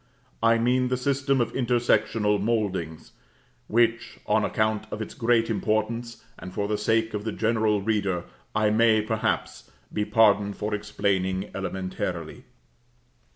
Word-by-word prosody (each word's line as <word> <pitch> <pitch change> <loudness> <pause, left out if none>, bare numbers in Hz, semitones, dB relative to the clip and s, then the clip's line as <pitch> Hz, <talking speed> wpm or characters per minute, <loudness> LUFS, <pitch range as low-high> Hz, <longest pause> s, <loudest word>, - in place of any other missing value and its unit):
I 115 0 +4
mean 125 +2 +2
the 125 0 0
system 135 +1 +1
of 120 - -2
intersectional 110 -4 +1
mouldings, 100 -8 -2 0.6
which, 115 0 +1
on 110 +1 +2
account 110 +1 0
of 110 - -5
its 110 - -5
great 115 -1 +2
importance, 115 +2 -2 0.2
and 90 - -8
for 100 +2 -2
the 105 - 0
sake 110 +2 +1
of 105 -1 -3
the 110 - -2
general 110 -2 +1
reader, 100 -5 0 0.3
I 110 -1 +3
may, 110 -1 +4
perhaps, 110 0 -2 0.2
be 105 - 0
pardoned 105 -2 +3
for 105 +1 -3
explaining 100 -2 -1
elementarily. 90 -3 -4
110 Hz, 135 wpm, -26 LUFS, 100-115 Hz, 0.6 s, I